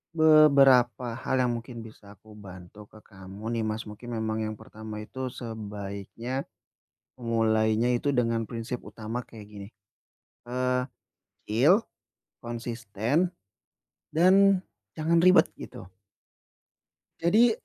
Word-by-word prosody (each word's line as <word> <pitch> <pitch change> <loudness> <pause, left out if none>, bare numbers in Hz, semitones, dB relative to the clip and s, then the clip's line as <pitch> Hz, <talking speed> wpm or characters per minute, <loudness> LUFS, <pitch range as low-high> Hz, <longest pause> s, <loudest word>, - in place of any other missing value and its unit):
beberapa 140 -6 +5
hal 130 0 0
yang 125 - +1
mungkin 115 0 -9
bisa 105 -2 -14
aku 110 +3 -19
bantu 95 +1 -12
ke 110 - -16
kamu 100 +3 -9
nih, - - -1
Mas, 110 +1 -3
mungkin 115 +3 -7
memang 110 0 -2
yang 110 0 -4
pertama 110 0 -8
itu 130 +4 -5
sebaiknya 110 +2 -6 0.8
mulainya 110 0 +2
itu 140 +4 0
dengan 115 -3 +1
prinsip 115 +1 -5
utama 115 +2 -6
kayak 110 -2 -13
gini, 100 -1 -10 0.8
eee, 125 0 0 0.6
feel, 145 - +4 0.6
konsisten 120 - -2 0.8
dan 190 +3 +5 0.3
jangan 165 +2 +1
ribet, 185 0 +6
gitu. 95 - -10 1.3
Jadi, 215 +8 +5
115 Hz, 110 wpm, -27 LUFS, 110-130 Hz, 1.3 s, ribet